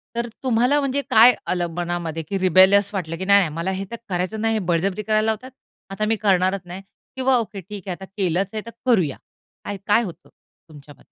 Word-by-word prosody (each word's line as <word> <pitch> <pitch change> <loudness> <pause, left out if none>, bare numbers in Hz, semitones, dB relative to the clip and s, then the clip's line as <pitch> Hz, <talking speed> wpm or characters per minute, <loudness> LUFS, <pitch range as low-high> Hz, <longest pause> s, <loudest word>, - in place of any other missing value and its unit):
तर 235 0 -2 0.2
तुम्हाला 250 +3 +2
म्हणजे 275 0 -1
काय 235 +3 +7
आलं 175 -1 0
मनामध्ये? 170 -2 -3
की 195 - -2
रिबेलस 190 +2 +5
वाटलं, 165 -4 -4
की 190 - -4
"नाही 200 +1 +6
नाही, 185 -5 +1
मला 170 +3 -2
हे 190 +1 -4
तर - - -4
करायचं 185 +4 -2
नाही, 225 0 +1
हे 220 - 0
बळजबरी 185 +5 0
करायला 215 0 +1
लावतात, 220 +4 -2 0.4
आता 195 +2 -2
मी 225 +1 +2
करणारच 195 -2 +1
नाही!" 180 +2 -8 0.3
किंवा 260 -1 +2
"ओके 205 -3 -4
ठीक 195 +1 -10
आहे - - -2
आता 190 - -10
केलंच 185 0 0
आहे 215 - -3
तर 230 - -8
करूया." 185 - +2 0.5
काय, 205 - -4
काय 215 +3 +4
होतं 180 -7 -9 0.4
तुमच्याब 145 -2 -14
195 Hz, 205 wpm, -22 LUFS, 180-220 Hz, 0.5 s, काय